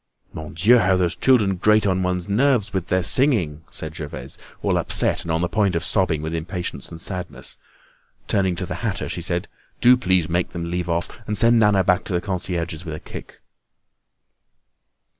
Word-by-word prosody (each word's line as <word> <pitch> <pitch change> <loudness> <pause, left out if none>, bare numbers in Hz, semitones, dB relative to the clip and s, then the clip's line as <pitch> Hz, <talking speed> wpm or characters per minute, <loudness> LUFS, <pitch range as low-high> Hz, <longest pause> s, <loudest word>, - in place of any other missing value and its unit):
"Mon 80 0 -8
Dieu! 115 +9 +5
how 95 -2 +3
those 90 -1 0
children 105 -8 +3
grate 105 +3 +3
on 95 -1 +1
one's 90 -1 -1
nerves 120 +1 +2
with 95 -2 -2
their 95 0 +1
singing!" 95 - +2
said 80 0 -4
Gervaise, 75 -3 -6 0.2
all - - +2
upset - - +1
and - - -8
on 80 +1 0
the 90 - +1
point 100 0 +1
of 85 - -1
sobbing 85 -6 0
with 80 +1 -3
impatience 90 +2 -4
and 80 - -9
sadness. 90 0 -6 0.7
Turning 95 -2 +1
to - - -4
the - - -6
hatter, - - -2
she - - -4
said: - - -1 0.3
"Do 125 +1 +7
please 95 -8 +1
make 85 +1 -1
them 85 -1 -4
leave 90 0 -2
off, 85 +7 -3
and 105 - -1
send 115 +2 +5
Nana 105 -3 +4
back 90 +2 +2
to 95 - -4
the 90 - +2
concierge's 85 -3 -3
with 80 -3 -5
a - - -7
kick." - - -11
90 Hz, 190 wpm, -22 LUFS, 85-105 Hz, 0.7 s, Do